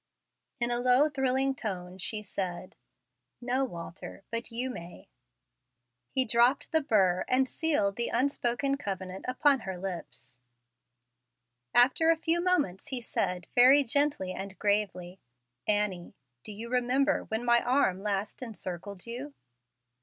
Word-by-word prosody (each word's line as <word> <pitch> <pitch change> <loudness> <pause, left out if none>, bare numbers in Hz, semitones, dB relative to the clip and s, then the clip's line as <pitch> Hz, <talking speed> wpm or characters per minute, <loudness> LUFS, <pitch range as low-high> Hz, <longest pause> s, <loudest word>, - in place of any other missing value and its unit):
In 240 0 0
a 240 - +1
low, 250 +4 +4
thrilling 270 -1 +1
tone 185 -6 -6
she 210 +3 -3
said, 185 -2 -5 0.6
"No, 250 +2 0
Walter, 175 -3 -7
but 230 +1 -3
you 250 +3 -2
may." 175 -6 -10 1.0
He 260 -1 +1
dropped 240 +7 +3
the 320 -1 +3
burr 190 -10 +2
and 260 +1 +2
sealed 255 -12 0
the 235 - +1
unspoken 275 0 0
covenant 190 -6 -5
upon 275 +2 +3
her 190 -5 -5
lips. 170 -9 -6 1.4
After 265 +7 +5
a 330 - +4
few 330 +2 +1
moments 295 - 0
he 260 - -1
said, 180 -6 -2
very 265 +4 +7
gently 280 -7 0
and 195 0 -7
gravely, 195 -3 -1 0.5
"Annie, 205 -4 0 0.3
do - - -7
you 220 +3 -7
remember 255 +3 +1
when 220 +2 -3
my 240 0 +4
arm 245 -8 +1
last 200 +2 -3
encircled 200 -5 -6
you?" 255 +5 -7
235 Hz, 130 wpm, -29 LUFS, 190-265 Hz, 1.4 s, very